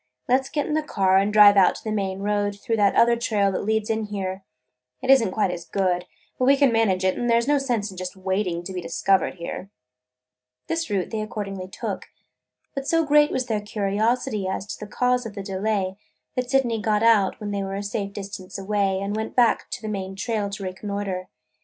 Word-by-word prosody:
Let 260 +2 +3
's 265 - -10
get 295 -2 -1
in - - -2
the 310 - +2
car 190 -10 +2
and 200 +2 +1
drive 205 -1 +8
out 190 - +5
to - - -10
the 220 - -3
main 195 -2 -2
road 205 0 -1
through 225 0 -1
that 205 -2 +3
other 235 0 +5
trail 210 -4 +1
that 185 - -2
leads 220 0 0
in 220 -1 -1
here. 195 -2 -4 0.6
It 265 - +2
is 270 -3 +7
n't 195 - -1
quite 195 -2 +1
as 175 - -5
good, 180 -2 -1 0.3
but 255 - +2
we 275 +2 +5
can 275 -3 +4
manage 200 -5 +2
it, 185 - +2
and 240 - -1
there 230 0 +5
's 235 - -3
no 290 0 +3
sense 235 -7 -1
in 185 - -12
just 185 +1 -5
waiting 190 -2 -1
to 190 - -6
be 180 - -3
discovered 180 +3 +1
here." 180 +2 -6 1.0
This 330 -4 -2
route 195 -3 -1
they 220 -1 -2
accordingly 200 -3 -5
took. - - -5 0.7
But 275 0 -4
so 330 -1 +2
great 295 0 +5
was 260 - -1
their 220 -4 -1
curiosity 210 +1 -1
as 190 +1 -3
to - - -10
the 210 - -10
cause 250 -1 +1
of 215 - -10
the 200 - -5
delay, 195 0 -1 0.4
that 250 -1 -2
Sydney 245 -5 +1
got 210 0 +1
out, 215 -4 +4
when 205 -1 -4
they 200 -1 -1
were 195 0 -4
a 200 - -3
safe 200 -1 -3
distance 195 -2 -7
away, 195 -1 0
and 200 +1 -3
went 220 0 -4
back 240 -2 +3
on 245 - -4
the - - -4
main 195 -2 -4
trail 210 0 -2
to 200 0 -6
reconnoiter. 190 0 -4
205 Hz, 225 wpm, -24 LUFS, 195-230 Hz, 1.0 s, drive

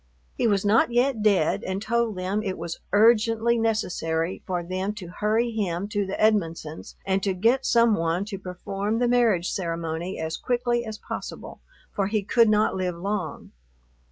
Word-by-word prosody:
He - - +1
was 200 -2 +1
not 220 +3 +4
yet 245 -1 +2
dead 200 -7 +2
and 190 +1 -2
told 230 0 0
them 185 +3 -1
it 190 -3 -3
was 165 0 -5
urgently 225 +2 +4
necessary 180 -6 -1
for 180 -2 -2
them 185 +4 -3
to 185 -6 -8
hurry 220 +3 +1
him 200 -4 -2
to 205 -2 -1
the 190 - -4
Edmonsons' 165 -7 0
and 195 0 +1
to 190 -1 0
get 235 +8 +2
some 235 -1 +4
one 165 +3 -1
to 200 -2 -6
perform 195 +3 -3
the 245 +1 +2
marriage 230 -8 +2
ceremony 170 0 -3
as 160 0 -3
quickly 240 -1 0
as 220 -1 -6
possible, - - -7 0.3
for 195 -1 -1
he 210 0 0
could 230 +3 +4
not 210 0 +2
live 180 -2 -2
long. 185 -3 -4
200 Hz, 170 wpm, -25 LUFS, 180-225 Hz, 0.3 s, not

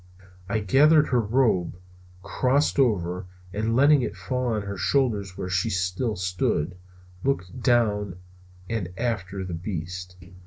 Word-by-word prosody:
I 110 +1 0
gathered 150 +9 +5
up - - -9
her 125 - +4
robe, 105 -6 +1 0.5
crossed 135 +8 +1
over, 90 -8 +1 0.3
and 110 +2 0
letting 140 +2 +5
it - - -3
fall 130 -1 -2
on 110 -3 -1
her 100 0 -5
shoulders 105 -10 0
where 90 - -4
she 90 -1 0
still 95 +5 -1
stood, 90 -2 -1 0.5
looking 110 -7 -2
down 105 -7 +1 0.5
and 110 -6 -2
after 100 -5 -2
the 90 -2 -5
beast. 90 0 -5
105 Hz, 140 wpm, -25 LUFS, 90-125 Hz, 0.5 s, gathered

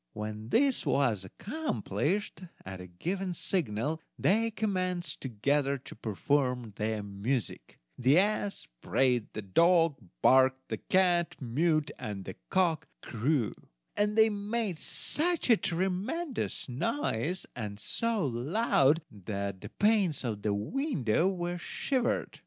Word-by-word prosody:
When 105 +1 -5
this 270 - +3
was 120 -9 +1
accomplished, 185 - -3 0.2
at 95 0 -7
a 90 - -9
given 180 - -3
signal 155 - 0 0.2
they 225 +4 +3
commenced 185 -7 -2
together 140 +4 0
to 130 - -10
perform 125 +1 -1
their 110 0 -1
music: 100 +5 -3 0.2
the 130 +5 +5
ass 205 +1 +1
brayed, 125 -4 +1
the 110 - -5
dog 165 - +4 0.2
barked, 130 0 +4
the - - -2
cat 175 -3 +2
mewed, 155 +4 +1
and 100 -3 -5
the 95 - -7
cock 175 -5 +1 0.2
crew; 120 0 0 0.4
and 210 +1 +1
they 220 0 +7
made 205 -3 -2
such 330 -4 +2
a - - +9
tremendous 195 - -2
noise, 170 - -1
and 105 -3 -5
so 225 - 0
loud, 145 - +2
that 100 -1 -5
the - - -8
panes 205 -9 +2
of 110 -4 -3
the 105 -1 0
window 170 - 0
were 175 -2 -3
shivered! 255 +7 -1
150 Hz, 125 wpm, -30 LUFS, -, 0.4 s, a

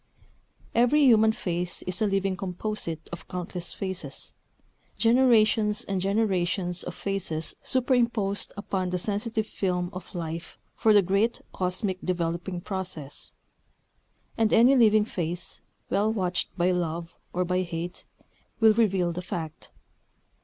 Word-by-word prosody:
Every 245 +6 +4
human 220 -4 +6
face 180 -5 -3
is 185 +3 -4
a 215 - +4
living 195 -1 +1
composite 180 -3 -4
of 170 - -8
countless 180 -1 -5
faces, 190 -2 -6 0.6
generations 225 -3 +4
and 195 -2 -2
generations 185 -3 +1
of 180 - -6
faces 185 -5 -3
superimposed 235 -6 +1
upon 190 -2 -2
the 180 - -1
sensitive 215 +3 -2
film 180 -4 -2
of 185 +1 -9
Life 165 -1 -5 0.2
for 220 - +3
the 205 -2 +6
great 200 +6 +1
cosmic 185 +1 -1
developing 175 0 -2
process. 180 -7 -5 1.1
And 220 -1 +3
any 245 +4 +6
living 215 -4 +5
face, 175 -3 -4 0.3
well 210 +2 +2
watched 185 -5 -1
by 180 +1 +3
love 170 -1 -2 0.2
or 180 +1 0
by 180 +1 +1
hate, 175 0 -5 0.6
will 220 -1 +7
reveal 195 -6 +2
the 175 +1 -4
fact. 160 -3 -6
190 Hz, 125 wpm, -27 LUFS, 175-215 Hz, 1.1 s, will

